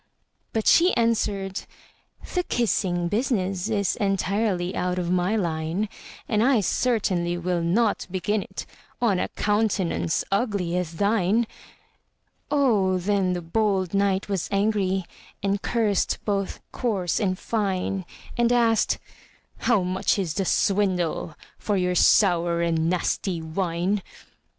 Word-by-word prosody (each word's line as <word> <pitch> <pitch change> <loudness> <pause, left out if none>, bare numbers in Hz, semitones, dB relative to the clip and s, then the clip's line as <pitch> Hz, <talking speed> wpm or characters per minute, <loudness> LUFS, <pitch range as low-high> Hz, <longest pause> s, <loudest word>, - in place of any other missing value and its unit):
But 220 -1 -1
she 355 +2 +5
answered, 205 -4 0 0.7
"The 360 - +2
kissing 190 - 0
business 200 -3 -1
Is 200 -4 +1
entirely 195 -2 0
out 180 0 -1
of 175 -1 -1
my 180 +4 +1
line; 170 +1 -1 0.4
And 215 -2 +1
I 255 0 +4
certainly 185 -6 0
will 175 0 -1
not 205 +6 +1
begin 190 +3 -1
it - - -7 0.3
On 215 -7 +2
a - - 0
countenance 205 -6 0
ugly 200 -5 0
as 180 -2 -2
thine!" 205 +4 +2 1.0
Oh, 215 -10 +2
then 190 0 +1
the 175 -1 -4
bold 190 0 0
knight 195 -1 +1
was 195 -4 -2
angry, 195 -2 +1 0.4
And 200 0 0
cursed 220 -4 +1
both 200 -2 -2
coarse 200 -8 -1
and 185 -3 0
fine; 195 -3 -1 0.3
And 240 0 +2
asked, 230 -2 +3 0.6
"How 220 -6 +2
much 185 +3 0
is 180 -6 -1
the 195 +2 -1
swindle 185 -6 0 0.2
For 205 -2 0
your 180 -1 +1
sour 175 -2 +4
and 165 -1 +1
nasty 180 0 -1
wine?" 175 +4 -1
195 Hz, 125 wpm, -25 LUFS, 180-215 Hz, 1.0 s, she